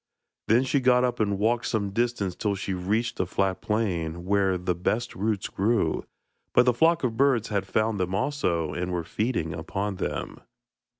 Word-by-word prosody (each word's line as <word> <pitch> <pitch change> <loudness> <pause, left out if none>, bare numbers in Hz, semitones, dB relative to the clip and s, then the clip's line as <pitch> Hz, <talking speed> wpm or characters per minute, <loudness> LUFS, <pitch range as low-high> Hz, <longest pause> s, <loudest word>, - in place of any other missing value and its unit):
Then 120 +4 +4
she 135 +2 +1
got 125 -1 +4
up 125 -1 0
and 100 -2 +1
walked 115 +4 +1
some 100 -3 -1
distance 110 -4 -1
till 105 -2 -1
she 95 0 -3
reached 105 +6 -1
a 95 - +1
flat 95 0 0
plain, 85 -6 -1
where 95 -1 +2
the 90 0 -1
best 110 +7 -1
roots 105 0 -1
grew, 100 -5 0 0.5
but - - +6
the 125 - +4
flock 165 +5 +3
of 120 -3 0
birds 135 -5 +3
had 100 -3 -1
found 110 -1 0
them 90 +1 -1
out - - +1
also, 100 - 0
and 90 +1 -3
were 90 -1 -1
feeding 95 -5 -2
upon 95 +5 -3
them. - - -4
100 Hz, 185 wpm, -26 LUFS, 90-120 Hz, 0.5 s, but